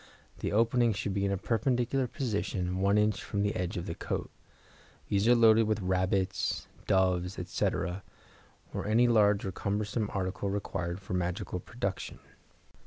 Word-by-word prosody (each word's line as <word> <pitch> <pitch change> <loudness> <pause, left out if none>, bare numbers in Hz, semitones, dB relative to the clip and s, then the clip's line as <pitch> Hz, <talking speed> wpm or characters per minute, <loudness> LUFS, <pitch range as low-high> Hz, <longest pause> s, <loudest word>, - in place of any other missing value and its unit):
The - - -2
opening 115 +2 +3
should 100 0 -3
be 100 0 0
in 100 - +1
a 100 - 0
perpendicular 125 +4 0
position 100 -8 -2
1 100 +2 +3
in. 105 0 +4
from 100 -1 -3
the 105 - 0
edge 90 +2 -2
of 85 - -3
the - - -3
coat. - - -4 0.8
These 100 +2 +2
are 120 - +7
loaded 115 -1 +6
with 110 0 +1
rabbits, 95 0 0 0.2
doves, 90 -1 +2
etc., 90 +1 -1 0.7
or - - -3
any 115 +3 +4
large 105 -4 +4
or 95 - -2
cumbersome 105 +3 -2
article 95 +1 -2
required 95 -3 -3
for 95 -1 -7
magical 90 +1 -2
production. 100 -1 -4
100 Hz, 155 wpm, -30 LUFS, 95-110 Hz, 0.8 s, are